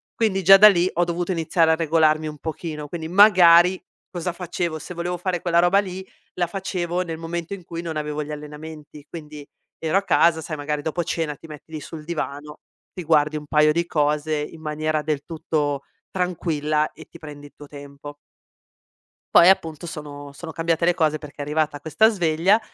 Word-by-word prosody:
Quindi, 195 -4 0
già 195 +2 +9
da 210 +2 +9
lì, 180 -1 +2
ho 175 - +1
dovuto 175 +2 -2
iniziare 165 -1 +2
a - - +4
regolarmi 155 -1 +2
un 150 -1 -7
pochino, 155 -2 -6
quindi, 160 -2 -5
magari, 180 -2 +6 0.3
cosa 175 -1 -4
facevo, 170 -2 -3
se 180 - -8
volevo 175 +1 -3
fare 180 -1 -2
quella 170 -1 +2
roba 175 +3 +4
lì, 190 -1 -5 0.3
la 175 - +1
facevo 180 -1 -3
nel 165 -2 -6
momento 170 +2 -5
in 185 -3 -8
cui 170 0 -6
non 165 -2 -5
avevo 150 0 -3
gli 150 - -8
allenamenti, 150 0 -10
quindi 150 -3 -9 0.3
ero 160 +4 0
a 195 - +1
casa, 165 -3 +3
sai, 155 -1 -6
magari 145 0 -3
dopo 160 +3 -2
cena 155 -2 -3
ti 160 - -14
metti 150 +1 -12
lì 155 - -5
sul 155 +1 -9
divano, 150 -3 -5 0.3
ti 180 - -6
guardi 150 -1 +2
un 150 - -8
paio 150 0 +4
di 170 +2 0
cose 150 0 0
in 150 +2 -6
maniera 155 0 -2
del 150 -2 -2
tutto 150 -3 -2 0.3
tranquilla 155 -4 -1
e - - -14
ti - - -15
prendi 145 -2 -10
i - - -22
tuo 145 - -13
tempo. 145 0 -11 1.2
Poi, 170 - +8
appunto, 165 -3 +2
sono 145 -2 -8
sono 160 +2 -8
cambiate 165 +1 -1
le 175 +1 +4
cose 155 -3 +1
perché 150 -2 -13
è - - -5
arrivata 150 0 -1
questa 165 +9 +3
sveglia, 180 +1 +2
160 Hz, 195 wpm, -22 LUFS, 150-175 Hz, 1.2 s, già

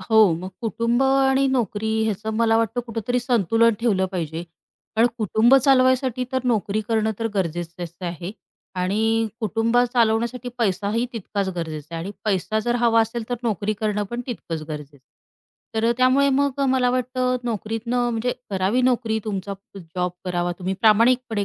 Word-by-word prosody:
हो, 220 -5 +5
मग 185 - -5
कुटुंब 230 +3 0
आणि 270 0 +3
नोकरी 220 -4 -1 0.2
ह्याचं 215 0 -2
मला 225 -1 +3
वाटतं 230 +2 0
कुठेतरी 230 +2 -1
संतुलन 230 -1 +3
ठेवलं 195 -5 +2
पाहिजे. 165 -2 -3 0.5
कारण 230 +2 +5
कुटुंब 220 +4 +4
चालवायसाठी 260 -1 +3
तर 260 - +1
नोकरी 215 -3 0
करणं 220 -1 +1
तर 225 - -1
गरजेचंच 175 -1 -3
आहे 175 0 -5 0.5
आणि 225 +4 +1
कुटुंब 225 +2 0 0.2
चालवण्यासाठी 235 +1 +1
पैसाही 210 +2 0
तितकाच 200 -3 -3
गरजेचा 160 -1 -5
आहे 165 - -3
आणि 200 - -5
पैसा 210 +1 0
जर 240 +2 -1
हवा 230 -1 +5
असेल 225 0 -2
तर 245 - 0
नोकरी 215 -2 -1
करणं 210 -1 0
पण 240 +1 -3
तितकंच 165 - -5
गरजेचं 150 -2 -7
आहे. - - -22 0.8
तर 225 +1 +2
त्यामुळे 255 +2 +4
मग 280 0 +1
मला 255 -1 +3
वाटतं 255 0 0
नोकरीतनं 235 +2 -1
म्हणजे 235 +2 -1 0.2
करावी 195 +6 +1
नोकरी, 235 -3 +1
तुमचा 200 -1 -3 0.4
जॉब 180 0 0
करावा 175 -1 -1
तुम्ही 190 +1 -2
प्रामाणिकपणे 225 0 +3
225 Hz, 150 wpm, -23 LUFS, 195-245 Hz, 0.8 s, हो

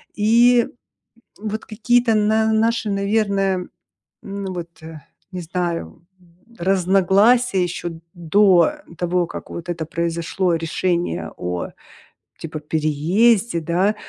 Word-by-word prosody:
и 235 +3 +4 0.7
вот 215 0 -4
какие-то 235 +2 +1
на 220 +1 +2
наши, 225 0 +1
наверное, 200 -2 0 0.5
ну 195 -1 -5
вот, 170 -2 -8
э, 160 -1 -10 0.3
не 180 - -5
знаю, 170 -1 -4 0.2
м, 170 -1 -26 0.2
разногласия 195 +4 +3
еще 170 -1 -4
до 180 - +4 0.2
того, 175 0 0
как - - -9
вот 170 +1 -7
это 170 -2 -3
произошло 170 +2 -1
решение 165 - -2
о 90 0 -4 0.7
типа 155 -1 -6
переезде, 170 +8 +1
да. 180 +6 +1
185 Hz, 105 wpm, -21 LUFS, 170-215 Hz, 0.7 s, и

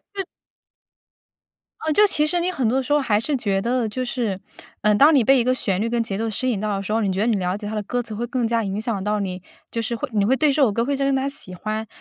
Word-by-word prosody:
对。 390 - -2 1.6
呃， 315 - -2
就 420 +6 +6
其 305 -7 +2
实 350 +2 0
你 360 +2 0
很 265 -9 -1
多 260 +3 +1
时 265 +3 -1
候 295 - +4
还 220 -7 +1
是 285 +6 -1
觉 205 -6 0
得 240 +2 0
就 255 +4 -3
是， 230 -6 -2 0.4
呃， 210 0 +3
当 285 +9 +6
你 265 - +5
被 265 +3 +5
一 - - +2
个 255 +1 +2
旋 195 -6 +1
律 230 - 0
跟 235 -1 0
节 200 -3 -4
奏 225 +1 -1
吸 240 +5 -2
引 210 - -2
到 210 -1 -1
的 195 - -4
时 210 - -3
候， 225 - +2
你 200 -3 0
觉 190 - -2
得 210 - +2
你 235 -2 +2
了 180 0 -1
解 210 - -8
它 215 - -5
的 215 - -1
歌 245 +4 -2
词 225 - -8
会 235 +3 -3
更 245 -1 -1
加 230 0 +1
影 195 0 -3
响 220 -3 -2
到 210 +1 0
你， 185 -2 -4 0.3
就 230 - -2
是 230 +1 -2
会 225 - -3
你 205 -2 +2
会 240 +6 +3
对 305 +2 +3
这 290 +2 +1
首 255 -6 +4
歌 230 +3 0
会 280 +2 0
加 275 - -1
深 275 0 +2
它 265 - 0
的 275 - -1
喜 185 -9 -4
欢。 215 +4 -4
230 Hz, 330 characters per minute, -22 LUFS, 210-265 Hz, 1.6 s, 就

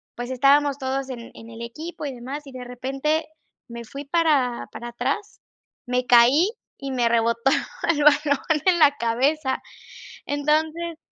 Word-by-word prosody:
pues, 245 +1 -5
estábamos 280 +2 +3
todos 270 0 -3
en 235 -2 -8
en 225 - -12
el 230 0 -8
equipo 305 +6 -7
y 275 - -4
demás, 265 +5 -7
y 275 - -11
de 255 -1 -8
repente, 270 +6 -2 0.4
me 235 0 -7
fui 280 +5 -8
para 285 -6 +1
para 240 - -7
atrás, 270 - -3 0.5
me 250 0 -1
caí 255 - +6 0.3
y 275 -1 -5
me 245 -2 +1
rebotó 235 +2 +2 0.4
el 295 -2 0
balón 290 -1 +3 0.2
en 365 -2 +4
la 295 -2 +7
cabeza. 265 +4 0 0.7
Entonces 310 +3 0
270 Hz, 150 wpm, -23 LUFS, 245-300 Hz, 0.7 s, la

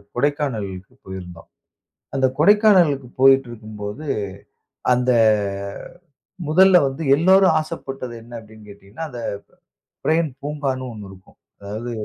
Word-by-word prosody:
கொடைக்கானலுக்கு 120 -9 -2
போயிருந்தோம். 90 -3 -10 0.7
அந்த 135 -1 +2
கொடைக்கானலுக்கு 180 - +4
போயிட்டு 135 -1 +6
இருக்கும்போது 110 +3 -8 0.9
அந்த 125 +1 +2 1.4
முதல்ல 185 +4 +6
வந்து 135 +4 -5
எல்லோரும் 190 +5 +4
ஆசைப்பட்டது 135 -6 -6
என்ன 120 +1 -15
அப்டின்னு 110 -1 -16
கேட்டீங்கன்னா 100 +9 -9
அந்த 125 -4 -8 0.9
பிரெயின் 160 0 +2
பூங்கான்னு 140 -3 -3
ஒண்ணு 105 -3 -10
இருக்கும். 95 0 -18 0.2
அதாது 110 +4 -6
130 Hz, 100 wpm, -21 LUFS, 105-155 Hz, 1.4 s, போயிட்டு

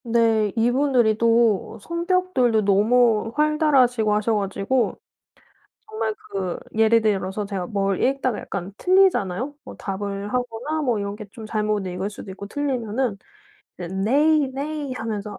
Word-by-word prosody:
네. 225 -3 +2
이분들이 245 -1 +2
또 230 -3 +2
성격들도 340 - +1
너무 220 +2 +3
활달하시고 275 -8 +3
하셔 215 +2 +1
가지고 200 +5 -1 0.9
정말 435 - -2 0.2
그 190 -3 -3 0.2
예를 225 +1 +4
들어서 200 -1 -1
제가 195 -3 -4
뭘 195 -1 -1
읽다가 260 -3 0
약간 195 0 -6
틀리잖아요. 290 - +2
뭐 - - -10
답을 200 +1 -4
하거나 250 +5 -2
뭐 245 -6 +1
이런 200 0 -3
게 210 0 -9
좀 220 +1 -10
잘못 210 -2 -1
읽을 185 +2 -3
수도 205 -1 -10
있고 200 +1 -8
틀리면은 250 -3 -2 0.6
이제 180 - -7
"Nay, 285 +11 +3
nay." 290 0 -4
하면서 215 -4 -5
225 Hz, 300 characters per minute, -23 LUFS, 205-265 Hz, 0.9 s, 예를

